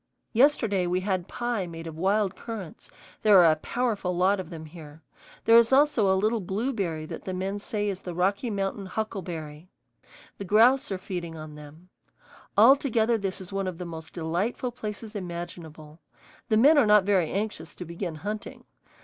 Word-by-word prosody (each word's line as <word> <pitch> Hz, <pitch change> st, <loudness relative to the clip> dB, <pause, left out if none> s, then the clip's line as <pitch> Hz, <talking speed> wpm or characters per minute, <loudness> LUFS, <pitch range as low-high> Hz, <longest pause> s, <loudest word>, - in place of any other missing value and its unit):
Yesterday 225 Hz, -7 st, +3 dB
we 180 Hz, +1 st, 0 dB
had 185 Hz, -2 st, -2 dB
pie 240 Hz, -6 st, -2 dB
made 165 Hz, -1 st, -8 dB
of 160 Hz, -1 st, -7 dB
wild 195 Hz, +3 st, +1 dB
currants; 210 Hz, -7 st, -8 dB, 0.3 s
there 210 Hz, -2 st, +6 dB
are 165 Hz, -, +6 dB
a -, -, +2 dB
powerful 205 Hz, -2 st, -2 dB
lot 190 Hz, +2 st, +3 dB
of 180 Hz, -3 st, -6 dB
them 160 Hz, -2 st, -8 dB
here. 155 Hz, -1 st, -12 dB, 0.4 s
There 230 Hz, +1 st, +8 dB
is 235 Hz, +1 st, +2 dB
also 265 Hz, -8 st, +4 dB
a 190 Hz, -, +3 dB
little 215 Hz, +4 st, +1 dB
blueberry 195 Hz, -5 st, -2 dB
that 160 Hz, +1 st, -8 dB
the 185 Hz, -, -3 dB
men 195 Hz, +2 st, -3 dB
say 210 Hz, 0 st, -3 dB
is 195 Hz, -2 st, -3 dB
the 175 Hz, -2 st, -6 dB
Rocky 200 Hz, +7 st, 0 dB
Mountain 195 Hz, -1 st, -3 dB
huckleberry. 175 Hz, -7 st, -5 dB, 0.7 s
The 200 Hz, -, -5 dB
grouse 230 Hz, +6 st, +4 dB
are 190 Hz, -, -1 dB
feeding 175 Hz, -3 st, -6 dB
on 155 Hz, -1 st, -9 dB
them. 150 Hz, +4 st, -13 dB, 0.7 s
Altogether 235 Hz, -1 st, +5 dB
this 195 Hz, -1 st, -3 dB
is 190 Hz, 0 st, -10 dB
one 195 Hz, -1 st, -1 dB
of 180 Hz, -2 st, -4 dB
the 180 Hz, -, -6 dB
most 160 Hz, -2 st, -8 dB
delightful 180 Hz, +9 st, -2 dB
places 215 Hz, -2 st, -7 dB
imaginable. 170 Hz, -4 st, -7 dB, 0.5 s
The 215 Hz, -, +3 dB
men 290 Hz, +6 st, +6 dB
are 240 Hz, -, +4 dB
not 210 Hz, -1 st, +6 dB
very 185 Hz, -5 st, +2 dB
anxious 195 Hz, -5 st, -4 dB
to 180 Hz, -, -7 dB
begin 170 Hz, 0 st, -5 dB
hunting. 210 Hz, +7 st, -6 dB
190 Hz, 175 wpm, -27 LUFS, 170-215 Hz, 0.7 s, There